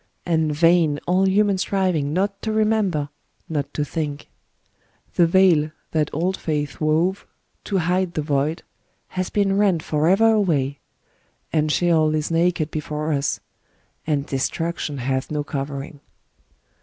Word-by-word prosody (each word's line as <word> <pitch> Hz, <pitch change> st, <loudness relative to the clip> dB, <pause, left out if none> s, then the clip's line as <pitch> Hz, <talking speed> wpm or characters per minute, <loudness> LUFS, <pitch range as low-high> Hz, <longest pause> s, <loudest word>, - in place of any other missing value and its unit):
And 160 Hz, -3 st, +1 dB
vain 165 Hz, -1 st, +3 dB
all 185 Hz, +2 st, +2 dB
human 200 Hz, 0 st, +2 dB
striving 185 Hz, -7 st, 0 dB
not 195 Hz, +4 st, -1 dB
to 220 Hz, -, -2 dB
remember, 215 Hz, -9 st, +1 dB, 0.4 s
not 145 Hz, -4 st, -3 dB
to 150 Hz, -, 0 dB
think: 150 Hz, -2 st, -4 dB, 0.8 s
the 170 Hz, -, +4 dB
Veil 170 Hz, -4 st, +4 dB, 0.2 s
that 155 Hz, -2 st, +1 dB
old 180 Hz, +5 st, -1 dB
faiths 150 Hz, -2 st, -3 dB
wove, 165 Hz, +5 st, +1 dB, 0.4 s
to 200 Hz, -, 0 dB
hide 180 Hz, +1 st, 0 dB
the 155 Hz, -, -1 dB
Void, 145 Hz, +2 st, -1 dB, 0.5 s
has 185 Hz, -1 st, -3 dB
been 200 Hz, -1 st, +1 dB
rent 190 Hz, -7 st, +2 dB
forever 185 Hz, +9 st, +3 dB
away; 145 Hz, -10 st, +1 dB, 0.3 s
— -, -, -40 dB
and 155 Hz, -1 st, +2 dB
Sheol 160 Hz, -2 st, +2 dB
is 155 Hz, +1 st, -2 dB
naked 165 Hz, -2 st, +1 dB
before 150 Hz, 0 st, -3 dB
us, 140 Hz, -1 st, -1 dB, 0.3 s
— -, -, -39 dB
and 145 Hz, -3 st, 0 dB
destruction 150 Hz, +2 st, -2 dB
hath 130 Hz, +1 st, -2 dB
no 150 Hz, -1 st, -2 dB
covering. 140 Hz, +1 st, -5 dB
160 Hz, 140 wpm, -22 LUFS, 150-185 Hz, 0.8 s, the